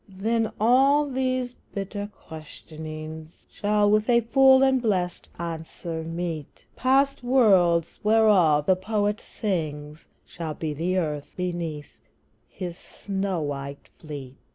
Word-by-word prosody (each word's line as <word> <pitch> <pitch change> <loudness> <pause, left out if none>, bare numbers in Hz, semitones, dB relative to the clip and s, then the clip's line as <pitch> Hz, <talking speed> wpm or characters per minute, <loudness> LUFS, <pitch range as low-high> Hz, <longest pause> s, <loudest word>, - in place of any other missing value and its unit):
Then 220 +4 -1
all 270 +6 +4
these 255 -2 -1 0.2
bitter 200 +1 -4
questionings 155 -1 -9 0.2
Shall 205 0 +2
with 215 +2 +2
a 235 -1 +5
full 265 +3 +5
and 265 -1 +3
blessèd 185 -6 -1
answer 165 0 -5
meet; 165 -2 -5
Past 275 +2 +2
worlds, 190 -10 +3
whereof 205 -9 +4
the 185 - +4
Poet 205 +2 -1
sings, 155 -6 -4 0.2
Shall 160 -3 -6
be 155 -1 -3
the 175 +5 -1
earth 150 -4 -2
beneath 170 -5 -4 0.6
his 175 -2 -6 0.3
snow 195 -3 -1
white 140 -1 -6
fleet. 140 -4 -8
185 Hz, 115 wpm, -25 LUFS, 160-225 Hz, 0.6 s, a